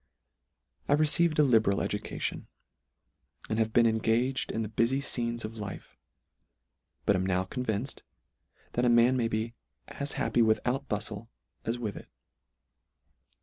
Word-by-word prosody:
I - - +5
received 155 +2 +3
a 150 - +6
liberal 110 -7 +3
education, - - -3 1.0
and 110 - -1
have 110 0 +1
been 115 +1 +5
engaged 115 +4 +1
in 110 - -1
the - - -3
bufy 115 +5 +1
fcenes 120 -4 -2
of 110 +1 -7
life: 100 -2 -7 1.1
But 100 - +4
am 95 - +1
now 95 0 +1
convinced, 115 +4 -3 0.7
that 120 - 0
a 125 - +4
man 120 +2 +5
may 120 -3 +1
be 115 +1 -2 0.4
as 140 0 -4
happy 120 - +1
without 125 +5 +1
buftle, 105 +1 -3 0.4
as 115 +2 -1
with 110 -5 -4
it. - - -10
115 Hz, 140 wpm, -29 LUFS, 110-125 Hz, 1.1 s, a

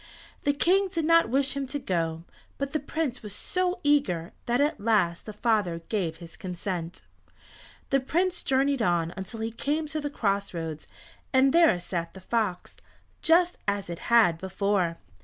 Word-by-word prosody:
The 285 - +3
King 380 +7 +3
did 335 -4 -2
not 330 -3 +5
wish 275 +3 +1
him 275 -1 -2
to 290 - -3
go, 165 - -2 0.3
but 280 +1 -3
the 310 - +1
Prince 285 -3 -3
was 210 -2 -7
so 365 0 -1
eager 190 - +1
that 240 +2 +2
at 295 +3 +1
last 200 -6 +1
the - - -4
father 210 -6 0
gave 180 -7 -1
his 165 0 -11
consent. 180 -1 -5 0.9
The 275 - +4
Prince 350 +7 0
journeyed 270 0 +1
on 175 -4 +1
until 195 +4 -6
he 225 +1 -2
came 295 +7 -1
to 310 0 -3
the 290 - -2
cross 200 -8 -1
roads, 160 -2 -5 0.4
and 265 0 +4
there 330 - +5
sat 170 -1 -4
the - - -8
fox, 205 -3 -2 0.4
just 345 +2 +3
as 200 -3 -1
it 170 - -6
had 220 -9 +5
before. 190 -2 0
225 Hz, 170 wpm, -27 LUFS, 180-290 Hz, 0.9 s, not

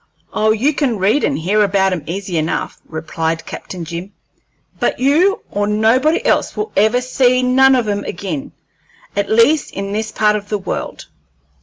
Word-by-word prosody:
"Oh, 215 0 +2
you 235 +8 +2
can 270 -6 0
read 205 +10 +2
and 285 - +1
hear 200 +6 +1
about 195 -1 +2
'em 175 - -3
easy 180 -1 -3
enough," 155 +1 -3
replied 160 0 -3
Captain 180 -3 -7
Jim, 170 +4 -7 0.7
"but - - 0
you 330 - +2
nor 205 0 0
nobody 230 +9 +2
else - - +1
will 425 +1 -3
ever 220 +4 +3
see 255 0 +2
none 265 +1 +5
of 245 -4 0
'em 205 0 -1
ag'in 175 -6 -5 0.6
at 200 0 -1
least, 230 +7 +3
in 195 0 -5
this 220 +1 -2
part 210 -1 +2
of 205 -1 -5
the 210 - 0
world. 195 - -5
210 Hz, 170 wpm, -17 LUFS, 190-255 Hz, 0.7 s, none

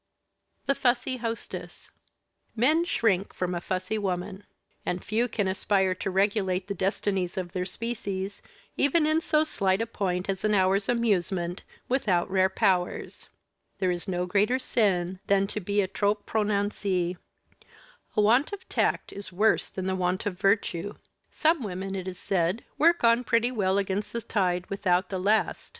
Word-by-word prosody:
THE 275 - +3
FUSSY 255 0 +1
HOSTESS 230 -1 -6 0.6
Men 305 +9 +3
shrink 200 - +1
from 180 -1 -2
a 175 - -3
fussy 185 +4 -2
woman. 190 +1 -3 0.4
And 180 0 -2
few 220 +5 +1
can 210 -4 -1
aspire 190 0 +1
to 185 - -4
regulate 190 -1 +1
the 200 - -2
destinies 195 -1 -1
of 180 -2 -3
their 180 0 -2
species, 200 -3 -4 0.3
even 300 +3 +3
in 310 +1 +2
so 310 -2 +3
slight 195 -10 0
a 225 - 0
point 185 -5 -2
as 195 -1 -2
an 210 0 +3
hour's 195 +1 +2
amusement, 190 -7 0 0.3
without 195 -9 +1
rare 190 0 +3
powers. 185 -1 0 0.5
There 185 -2 +1
is 175 -1 -4
no 180 -1 -1
greater 205 +7 +2
sin 190 -8 0
than 195 0 +3
to 210 - -4
be 200 +1 +1
trop 205 +2 -1
prononcée. 200 -4 0 1.0
A - - +6
want 240 - +4
of 395 -2 -8
tact - - 0
is 200 0 -8
worse 210 +5 +2
than 190 -1 -4
a 190 - 0
want 180 0 -1
of 205 - -1
virtue. 200 -1 +1 0.3
Some 320 -1 +2
women, 195 -2 -4
it 190 -1 -4
is 185 -1 -5
said, 185 +3 0 0.2
work 335 0 +4
on 235 +1 +5
pretty 230 +1 +2
well 195 -5 +1
against 200 +1 -2
the 235 - -2
tide 180 -4 0
without 185 -1 +1
the 190 - -2
last. 210 +4 +1
195 Hz, 160 wpm, -27 LUFS, 185-225 Hz, 1.0 s, A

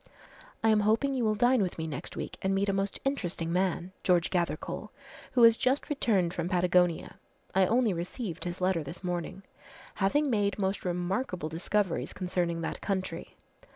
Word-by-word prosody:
"I 225 - +5
am 215 -1 +5
hoping 220 +7 +2
you 255 -2 0
will 215 -1 +2
dine 245 +2 +4
with 185 -3 -1
me 160 - -3
next 155 -4 -6
week - - -5
and 190 0 +1
meet 200 +1 +1
a - - +2
most 195 0 -1
interesting 175 -11 -1
man, 180 -1 0
George 175 -2 +3
Gathercole, 170 +3 -2 0.5
who 245 - +5
has 230 -1 +8
just 260 +5 0
returned 195 -11 +1
from 175 - -2
Patagonia, 180 -2 +2 0.4
I 190 -1 +4
only 230 -2 +3
received 175 +1 -4
his 175 0 -4
letter 185 -2 +2
this 165 +6 -9
morning 180 +2 -3 0.5
having 250 +10 +2
made 205 -3 +1
most 195 -1 -1
remarkable 180 0 -2
discoveries 180 +3 -1
concerning 175 -2 -1
that 165 - -4
country. 190 -2 -3
190 Hz, 170 wpm, -29 LUFS, 175-215 Hz, 0.5 s, has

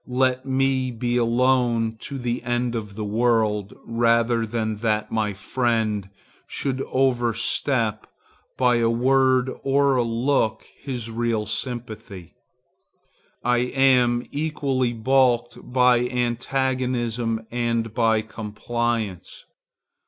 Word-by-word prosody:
Let 130 +1 0
me 130 -1 +1
be 120 0 -2
alone 120 -1 +2
to 140 - -6
the 120 -1 -2
end 120 0 -1
of 105 -4 -5
the 105 0 -4
world, 110 -2 +1
rather 115 0 +2
than 110 -1 -2
that 110 -1 -1
my 110 -2 0
friend 110 -2 -1 0.4
should 135 -1 -2
overstep, 120 -2 0 0.5
by 125 -2 +3
a 115 -1 +2
word 130 +1 +3
or 140 0 +2
a - - +3
look, 115 0 0
his 120 -5 -5
real 115 -2 -1
sympathy. 110 - -5 1.1
I 125 0 +2
am 125 -1 +3
equally 140 -5 -1
balked 120 0 +2
by 125 -1 +4
antagonism 120 -2 -1
and 115 -2 -1
by 110 -2 +2
compliance. 110 -2 -4
120 Hz, 105 wpm, -23 LUFS, 115-130 Hz, 1.1 s, by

